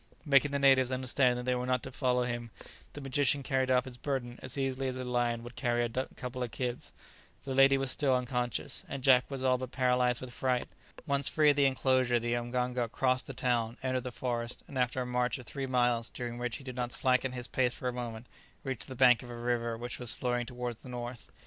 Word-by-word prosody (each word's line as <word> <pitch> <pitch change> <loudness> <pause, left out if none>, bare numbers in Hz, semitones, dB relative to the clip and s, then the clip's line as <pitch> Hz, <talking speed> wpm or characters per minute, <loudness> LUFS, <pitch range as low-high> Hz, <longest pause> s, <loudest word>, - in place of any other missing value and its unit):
Making 145 -1 +5
the 140 - -1
natives 135 -2 +5
understand 130 -1 +2
that 125 - -5
they 125 - +2
were 125 0 -2
not 125 -1 +1
to 130 - -6
follow 125 -1 +1
him, 120 -1 -3 0.4
the 145 - -7
magician 140 +1 +1
carried 130 -1 0
off 125 -1 +3
his 125 -2 -8
burden 130 -4 -3
as 130 +2 -6
easily 135 0 -1
as 130 0 -3
a 130 - -4
lion 120 -2 0
would 120 +1 -10
carry 120 -2 +1
a 120 - -1 0.3
couple 125 0 -6
of 125 - -1
kids. 125 +1 -4 0.5
The 135 - -4
lady 135 +1 +6
was 135 -1 0
still 135 -1 +2
unconscious, 125 -2 -1
and 135 -2 -5
Jack 130 -2 +5
was 135 -2 -4
all 130 -1 +3
but 130 -1 -5
paralyzed 125 -2 +2
with 125 -1 -8
fright. 125 -1 0 0.4
Once 140 -3 +2
free 150 -1 +5
of - - -1
the 140 -1 +4
enclosure 130 -2 +2
the 120 +1 -1
mganga 120 0 -1
crossed 130 0 +1
the 135 - -7
town, 120 -2 0
entered 130 -1 0
the 125 +1 -5
forest, 120 -1 -3
and 140 - -11
after 125 0 0
a - - -6
march 125 0 0
of 125 - -10
three 135 +5 -4
miles, 120 -2 +2
during 120 -1 -5
which 120 -1 -2
he - - -13
did 130 -2 -7
not 125 -1 -2
slacken 130 +1 +2
his 125 -1 -4
pace 125 -2 +1
for 125 - -4
a 125 - -1
moment, 120 -2 -5 0.4
reached 130 -6 -4
the 130 - -7
bank 125 -1 +6
of 125 - -10
a 120 - -7
river 120 -1 -1
which 120 +1 -4
was 125 -2 -2
flowing 120 -1 -1
towards 125 -2 -5
the 130 - -9
north. 120 -1 -6
125 Hz, 235 wpm, -31 LUFS, 120-130 Hz, 0.5 s, lady